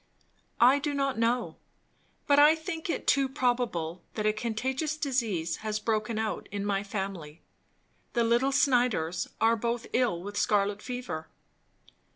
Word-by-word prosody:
"I 255 +4 +6
do 290 0 -2
not 275 -3 0
know, 235 +2 0 0.7
but 285 0 +5
I 300 +2 +7
think 320 +1 -5
it - - -2
too 275 -1 +3
probable, 240 - -1
that 215 - -2
a 215 - +3
contagious 260 +8 -2
disease 225 - -1
has 215 -1 -3
broken 215 0 -1
out 220 0 -3
in 200 0 -3
my 200 -1 0
family. 190 -6 -5 0.7
The 235 - +2
little 240 +4 +2
Snyders 240 - +2
are 225 +1 +4
both 235 +1 -2
ill 230 -9 +1
with 205 +1 -6
scarlet 205 0 +1
fever." 245 -12 -5
230 Hz, 145 wpm, -29 LUFS, 205-260 Hz, 0.7 s, I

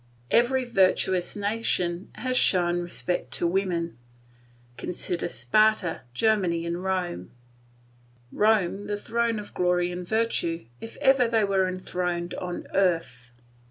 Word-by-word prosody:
Every 255 +2 +3
virtuous 185 -4 +2
nation 200 -4 -1
has 255 +3 -2
shown 175 -6 +2
respect 175 +1 -2
to - - -1
women. 170 - -1 0.8
Consider 175 +2 -2
Sparta, 180 - +2
Germany, 175 - +1
and 170 +2 -3
Rome; 180 - -2 1.0
Rome 205 -2 +2
the 205 0 -2
throne 230 +2 -1
of 210 -1 -8
glory 180 0 +1
and 180 0 -6
virtue, 220 - 0
if 225 - -9
ever 265 -2 +5
they 225 -2 +2
were 195 -2 +2
enthroned 180 -1 -3
on 180 -1 -5
earth. 165 -10 0
185 Hz, 120 wpm, -26 LUFS, 175-215 Hz, 1.0 s, ever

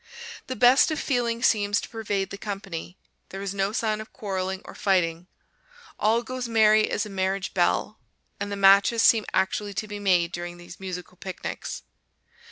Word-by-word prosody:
The 255 - -4
best 255 +5 +5
of 310 -2 -2
feeling 240 -3 -1
seems 205 -4 +3
to - - -7
pervade 205 -4 -3
the 200 - -6
company; 195 -4 -6 0.3
there 195 +1 -6
is 200 -1 -3
no 195 0 0
sign 215 -1 -1
of 215 - -11
quarreling 190 -2 -4
or - - -10
fighting; 175 -3 0 0.7
"all 225 +3 +2
goes 255 0 -5
merry 215 -1 +4
as 210 - -1
a - - -7
marriage 190 0 -2
bell," 190 +3 +1 0.4
and 200 0 -4
the - - -2
matches 200 +3 +5
seem 220 -2 +5
actually 200 +2 -1
to 215 - -3
be 205 0 -6
made 180 -4 +2
during 175 0 -6
these 175 0 -12
musical 180 -1 -7
picnics. 185 - -6
200 Hz, 175 wpm, -25 LUFS, 190-220 Hz, 0.7 s, best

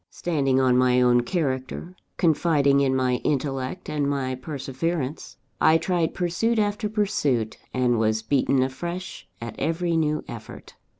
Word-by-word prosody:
Standing 140 -6 0
on 125 -1 +4
my 125 0 +4
own 125 -1 +4
character, 140 +3 -3 0.2
confiding 150 -4 +3
in 135 -1 +2
my 130 -1 +1
intellect 135 +3 -2
and 145 -2 -1
my 135 -2 -1
perseverance, 135 +2 -4 0.2
I 160 - +6
tried 165 0 -1
pursuit 185 +7 0
after 210 0 0
pursuit, 150 - 0
and 125 -2 +1
was 110 0 +1
beaten 130 +1 +2
afresh 175 +8 -5
at 115 -2 -6
every 165 +1 0
new 155 -1 +1
effort. - - -10
140 Hz, 135 wpm, -24 LUFS, 130-170 Hz, 0.2 s, I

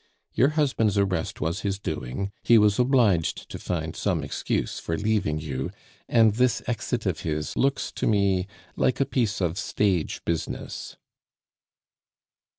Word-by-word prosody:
Your 130 - +4
husband's 115 -9 +2
arrest 95 -5 0
was 80 +2 -1
his 100 -1 -1
doing; 80 +2 -4
he 115 - +6
was 105 0 +4
obliged 120 - +2
to - - -6
find - - -3
some - - 0
excuse - - -2
for 85 - -3
leaving 105 -7 0
you, 65 -4 -3 0.4
and 115 -3 +5
this 125 +2 +2
exit 120 -1 -2
of 90 -5 0
his 75 -2 -3
looks 140 +1 +1
to - - 0
me 100 -3 +2 0.3
like 130 - +1
a 135 - +3
piece 115 -7 0
of 90 +1 0
stage 95 -6 0
business." 85 -1 -4
100 Hz, 145 wpm, -26 LUFS, 85-115 Hz, 0.4 s, he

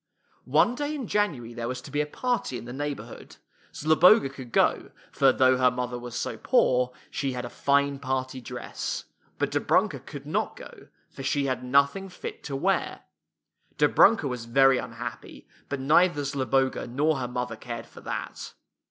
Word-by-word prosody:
One 240 - +4
day 290 +3 -3
in 270 -4 -4
January 145 - -1
there 115 0 -4
was 125 +1 -3
to 140 - -11
be 145 +1 +1
a 150 - -2
party 245 - -2
in 115 - -9
the 120 - -7
neighborhood. 145 +1 -6 0.4
Zloboga 160 +3 +5
could 130 -3 -10
go, - - +2 0.2
for 135 -1 +4
though 130 0 +4
her 130 0 +5
mother 125 -1 -3
was 120 -1 -8
so - - -3
poor, 125 - +2 0.2
she 135 -2 -2
had 125 -1 -4
a 120 - -8
fine 140 0 +1
party 130 -1 -3
dress; - - -5 0.3
but - - -1
Dobrunka - - +1
could - - -10
not - - -1
go, - - -12 0.2
for - - -9
she 140 +1 0
had 130 -1 -2
nothing 140 +9 +2
fit 180 - -8
to 140 - -4
wear. 190 +8 0 0.8
Dobrunka 220 -10 +5
was 125 -3 -4
very 135 +2 +4
unhappy, - - -8 0.2
but 140 - -3
neither 150 +2 +3
Zloboga 135 -2 0
nor 145 +5 +1
her 125 - -2
mother 125 -1 -3
cared 115 +1 -7
for - - -14
that. - - -6
135 Hz, 170 wpm, -27 LUFS, 125-150 Hz, 0.8 s, Zloboga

